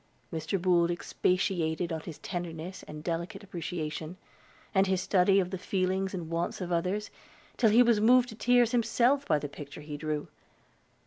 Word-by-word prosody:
Mr. 160 +4 -1
Boold 175 -1 +3
expatiated 175 -1 0
on 160 - -2
his 155 -1 -9
tenderness 175 0 -5
and 150 0 -8
delicate 170 +5 -3
appreciation, 165 -2 -5 0.6
and 195 -1 +4
his 190 -1 +1
study 195 +1 +3
of 180 -1 -1
the 190 - -4
feelings 190 0 0
and 170 -4 -5
wants 170 +1 -2
of 180 -2 -4
others, 185 +5 -1 0.4
till 225 - +4
he 235 +4 +7
was 235 -3 +3
moved 245 +2 +5
to 220 - -8
tears 245 +1 +3
himself 245 +3 +2
by 155 - +3
the 145 - -4
picture 145 +1 -10
he 150 0 -6
drew. 150 -1 -3
180 Hz, 170 wpm, -29 LUFS, 165-200 Hz, 0.6 s, he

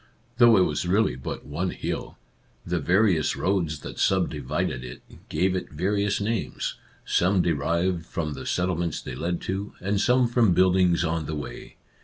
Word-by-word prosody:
Though 120 -3 +7
it - - +5
was 90 - -1
really 100 - +2
but 65 - -6
one 85 +6 -2
hill, - - -5 0.5
the 90 0 -1
various 90 +1 +2
roads 85 -6 -1
that - - -8
subdivided 65 0 0
it 60 -1 -9 0.3
gave 95 0 +1
it 90 - -3
various 100 +5 0
names, 110 +1 -2 0.3
some 90 +1 +2
derived 85 +2 0
from 80 -3 -3
the 65 - -7
settlements 85 -2 -1
they - - -7
led 85 +6 -2
to, 100 +2 -4
and 100 +2 0
some 125 0 +4
from 115 -6 +3
buildings 90 -2 +4
on 80 -2 -1
the 80 - -3
way. 75 - -7
90 Hz, 160 wpm, -25 LUFS, 80-100 Hz, 0.5 s, Though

